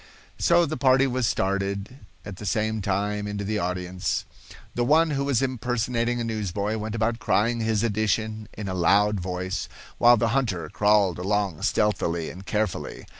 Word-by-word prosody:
So 175 - +4
the 155 0 -4
party 135 0 +5
was 130 -3 0
started 100 +4 -2 0.3
at 100 -3 -7
the 105 - -8
same 110 +1 0
time 105 +1 -1
into 105 0 -4
the 105 +1 -1
audience. 90 0 -2 0.5
The 120 - 0
one 155 +5 +4
who 140 -1 -1
was 135 -2 +1
impersonating 120 -1 -1
a - - -1
newsboy 105 -1 -2
went 110 +1 -4
about 115 +1 0
crying 115 0 +1
his 110 -1 0
edition 110 0 -1
in 105 -1 -6
a 95 - -2
loud 100 +3 +3
voice; 95 +1 -3 0.3
while 120 0 +7
the 115 +1 +1
hunter 115 -10 -1
crawled 105 -3 +2
along 100 -2 -1
stealthily 95 -6 0
and 95 +2 -12
carefully. 105 -3 -2
105 Hz, 165 wpm, -25 LUFS, 100-120 Hz, 0.5 s, while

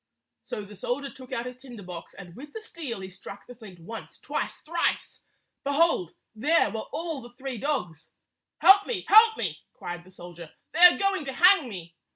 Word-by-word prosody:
So 210 - -5
the 205 +1 -12
soldier 265 +8 -3
took 255 -1 -13
out 235 - -2
his 250 0 -7
tinder 245 -5 -11
box, 180 -2 -9
and 180 -3 -11
with 290 +3 -11
the 445 - -6
steel 285 - -6
he 190 - -7
struck 195 +2 -11
the 245 - -11
flint 215 -6 -13
once, 220 +7 -9
twice, - - -4
thrice. 335 +2 -2 0.4
Behold, 280 - +1 0.2
there 290 +10 +2
were 220 -1 -5
all 325 -4 -4
the 240 0 -13
three 260 -3 -5
dogs! 180 - -3 0.5
"Help 400 +1 +7
me! 420 -7 -2
Help 440 +2 +7
me!" - - -3
cried 175 0 -7
the 185 - -18
soldier. 175 -3 -11 0.2
"They 320 - -4
are 355 0 +9
going 390 -4 0
to 270 - -4
hang 350 -2 +5
me!" 175 -5 -8
250 Hz, 190 wpm, -27 LUFS, -, 0.5 s, are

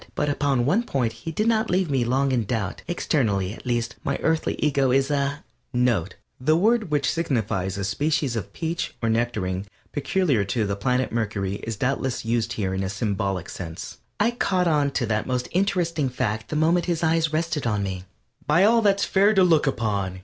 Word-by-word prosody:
But 150 - 0
upon 140 -4 +1
one 185 - +3
point 130 - -1
he 165 - -7
did 210 +7 -1
not 225 -1 +2
leave 180 -3 +1
me 130 -3 +2
long 135 +3 +1
in 120 -4 +1
doubt. 100 -3 -3
Externally, 110 - 0
at 120 - -11
least, 120 -2 -1
my - - -1
Earthly 160 0 +1
Ego 140 -3 +2
is 135 +2 +2
a 140 0 -1 0.3
(NOTE: 120 -8 +1 0.3
_The 155 +4 +4
word 220 0 +2
which 145 -2 +1
signifies 110 - -1
a 100 - -2
species 145 +4 0
of 110 - -4
peach 165 +1 -3
or 115 - +2
nectarine 105 -5 -1 0.2
peculiar 145 - +1
to 110 +2 -1
the 100 0 -1
planet 125 +5 0
Mercury 100 -4 -2
is 115 +1 -5
doubtless 130 +2 -1
used 115 0 0
here 95 -4 -2
in 95 - -1
a 95 - -2
symbolic 100 -3 -2
sense._) 85 +4 -7 0.2
I 220 +3 +3
caught 185 -6 +1
on 150 -3 +2
to 135 -3 -1
that 110 -1 -1
most 125 -1 -1
interesting 170 -6 +1
fact 110 -3 -2
the - - -3
moment 165 +3 +3
his 170 -1 -1
eyes 160 -1 +2
rested 155 -4 -1
on 105 -3 0
me. 95 -1 -4 0.4
"By 160 +6 +4
all 230 +3 +5
that's 200 -2 +3
fair 200 +2 +3
to 190 - +6
look 160 -5 +4
upon!" 100 -7 -1
130 Hz, 195 wpm, -24 LUFS, 110-160 Hz, 0.4 s, to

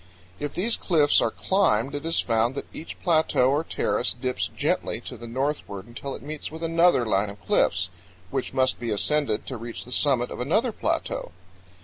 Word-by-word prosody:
If 145 -1 -4
these 225 +6 +1
cliffs 155 -5 +4
are - - +2
climbed 140 - +1
it 145 +2 -3
is 165 - +3
found 115 +2 +1
that - - -4
each 160 - -8
plateau 155 -6 +3
or 145 +3 +1
terrace 125 - 0
dips 125 0 -1
gently - - -1
to - - -7
the 120 - -9
northward 125 -6 -3
until 120 +4 -6
it - - -10
meets 150 +1 -5
with 160 +2 -8
another 165 -5 +4
line 100 -1 +1
of 100 0 -10
cliffs, 90 +1 +2 0.4
which 135 -2 -2
must 130 -1 +1
be 120 -1 -3
ascended 110 +1 +1
to 130 - -5
reach 115 -4 -7
the 125 - -11
summit 125 -2 +2
of - - -6
another 215 - +1
plateau. - - -2
135 Hz, 190 wpm, -25 LUFS, 115-160 Hz, 0.4 s, cliffs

